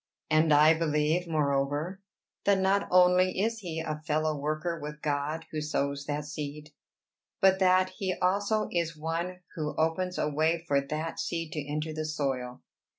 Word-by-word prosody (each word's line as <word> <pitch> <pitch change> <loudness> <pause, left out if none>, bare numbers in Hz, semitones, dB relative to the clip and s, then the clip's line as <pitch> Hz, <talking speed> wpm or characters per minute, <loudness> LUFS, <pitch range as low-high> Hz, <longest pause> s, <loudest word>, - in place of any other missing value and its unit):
And 155 0 +4
I 150 +2 +7
believe, 160 +2 +1
moreover, 150 +4 0 0.4
that 200 -1 +4
not 190 +1 +2
only 180 0 +4
is 225 +3 0
he 170 -6 -5
a 155 -1 -4
fellow 155 0 +1
worker 155 +4 -2
with 150 +1 -6
God 150 +2 -1
who 155 - -3
sows 140 -1 -2
that 150 0 -2
seed, 150 0 -6 0.7
but 190 0 +4
that 185 0 +4
he 190 -3 -1
also 200 +4 +1
is 165 -2 -1
one 170 +4 -3
who 150 -2 -3
opens 170 +3 0
a - - +1
way 160 +3 0
for 140 -2 +3
that 155 +3 -4
seed 165 -2 -3
to 150 - -3
enter 155 +1 -2
the 155 0 -3
soil. 135 -5 -3
155 Hz, 160 wpm, -29 LUFS, 150-180 Hz, 0.7 s, I